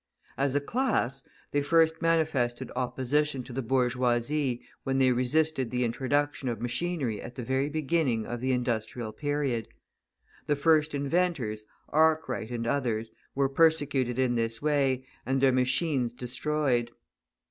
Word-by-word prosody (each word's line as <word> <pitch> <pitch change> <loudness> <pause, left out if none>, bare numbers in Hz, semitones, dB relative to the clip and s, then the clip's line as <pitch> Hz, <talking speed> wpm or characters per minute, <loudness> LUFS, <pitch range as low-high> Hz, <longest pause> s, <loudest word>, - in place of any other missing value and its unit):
As 140 0 0
a - - +4
class, 145 - 0 0.3
they 145 - +1
first 160 +2 +3
manifested 155 -8 +1
opposition 130 +2 0
to 125 - -10
the 135 - -2
bourgeoisie 125 +1 0 0.2
when 135 0 0
they 130 -1 +4
resisted 130 +1 +1
the 125 +1 0
introduction 135 +3 0
of 115 -3 -3
machinery 125 -1 -2
at 120 - -9
the 125 - -5
very 130 +3 0
beginning 150 -6 0
of 120 0 -5
the 130 +1 0
industrial 120 -2 -2
period. 140 -3 -1 0.8
The 145 - +2
first 155 0 +3
inventors, 140 -8 -1 0.2
Arkwright 155 -7 +2
and 120 -1 -3
others, 115 -4 -1 0.2
were 135 0 +2
persecuted 140 -4 +2
in 130 -2 +2
this 115 -1 -1
way 135 -3 +1 0.2
and 135 +1 0
their 135 0 +5
machines 130 -1 +1
destroyed. 125 0 -1
130 Hz, 135 wpm, -28 LUFS, 120-150 Hz, 0.8 s, their